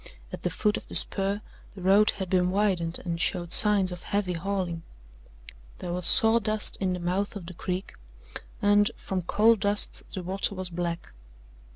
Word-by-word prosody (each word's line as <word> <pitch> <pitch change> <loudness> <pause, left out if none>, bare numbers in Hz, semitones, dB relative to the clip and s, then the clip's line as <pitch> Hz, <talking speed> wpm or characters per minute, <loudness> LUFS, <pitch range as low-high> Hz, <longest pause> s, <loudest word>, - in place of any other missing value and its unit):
At - - -7
the - - -2
foot 210 -2 -1
of - - -10
the - - -4
spur 200 +1 +1 0.3
the 190 - -10
road 200 +3 +4
had 190 - -4
been 180 0 +1
widened 185 -4 0
and 170 -1 -3
showed 175 -3 -1
signs 205 -3 +5
of 180 0 -8
heavy 200 -3 -2
hauling. 180 -1 -4 1.0
There 175 - -6
was 180 -1 -2
sawdust 220 -1 +4
in 190 -2 -1
the 180 - -5
mouth 185 +4 -3
of 195 -4 -8
the 180 - -9
creek 180 +2 -5 0.7
and, 205 +1 +3
from 190 -1 -4
coal 215 +6 +3
dust, 205 0 +1
the 185 - -6
water 195 +2 -2
was 185 -1 -6
black. 170 - -5
190 Hz, 175 wpm, -26 LUFS, 180-205 Hz, 1.0 s, signs